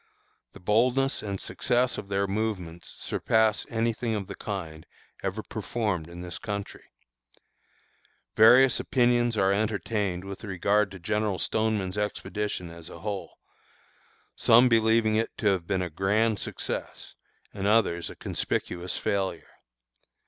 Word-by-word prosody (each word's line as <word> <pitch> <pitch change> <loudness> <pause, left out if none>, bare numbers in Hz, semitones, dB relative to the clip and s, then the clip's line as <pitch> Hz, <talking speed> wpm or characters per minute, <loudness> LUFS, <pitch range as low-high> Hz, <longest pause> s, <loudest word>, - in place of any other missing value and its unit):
The - - -12
boldness 125 +8 +2
and 100 -2 -4
success 125 0 0
of 100 - -9
their 100 0 +1
movements 95 -5 -3
surpass 110 -1 +1
any 115 0 0
thing 115 0 -2
of 100 -2 -3
the 100 - -7
kind 85 -7 -6 0.3
ever 100 +3 -3
performed 105 -6 -3
in 85 +1 -9
this 90 0 -6
country. 100 -1 -5 1.5
Various 125 +4 +7
opinions 120 -2 +2
are 95 0 +3
entertained 105 -3 -1
with 100 +2 -8
regard 100 +1 +1
to 100 - -9
General 105 +2 -1
Stoneman's 105 -1 0
expedition 105 -3 -3
as 85 0 -10
a - - -11
whole, 100 -1 -5 1.0
some 120 +3 +6
believing 110 -1 +3
it 115 - -2
to 105 -5 +2
have 90 -4 0
been 95 -2 0
a 90 - -3
grand 105 +5 +1
success, - - -5 0.4
and 100 0 -2
others 100 -6 +2
a - - -9
conspicuous 90 +1 -3
failure. 95 -1 -2
105 Hz, 135 wpm, -27 LUFS, 95-110 Hz, 1.5 s, Various